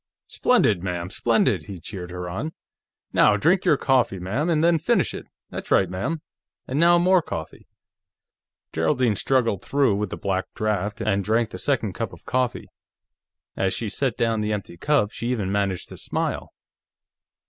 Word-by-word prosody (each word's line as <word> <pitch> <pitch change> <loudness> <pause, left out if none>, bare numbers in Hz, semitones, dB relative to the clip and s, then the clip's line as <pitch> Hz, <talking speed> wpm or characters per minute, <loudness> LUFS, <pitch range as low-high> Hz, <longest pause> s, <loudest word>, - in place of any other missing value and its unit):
"Splendid, 95 -5 +3
ma'am; 90 -1 -3
splendid!" - - +1
he 95 -3 -8
cheered 90 0 -7
her 90 0 -5
on. 145 - -4 0.6
"Now, 105 - +5
drink 175 - +2
your 150 - +4
coffee, 130 -8 +2
ma'am, 105 - -1
and 160 -2 +2
then 170 -1 +4
finish - - +1
it. - - -8 0.2
That's - - -6
right, 95 - +4
ma'am. 150 - -3 0.4
And 135 +3 -1
now, 170 +1 +6
more 180 +1 +4
coffee." 80 - -7 1.1
Geraldine 125 -6 +2
struggled 115 -5 +1
through 140 -6 +2
with 105 -1 -2
the - - -5
black 95 -1 -1
draft 105 0 -1
and 100 -3 +1
drank 110 +2 +1
the - - -7
second - - 0
cup - - -4
of - - -14
coffee. 125 -2 -1 0.9
As 95 -1 0
she 115 - -3
set 130 +4 -1
down 115 -2 +1
the 105 0 0
empty 100 -4 -5
cup, 115 - +1
she 115 - -5
even 110 -6 -1
managed 100 -3 -1
to - - -10
smile. - - -3
110 Hz, 170 wpm, -24 LUFS, 95-135 Hz, 1.1 s, now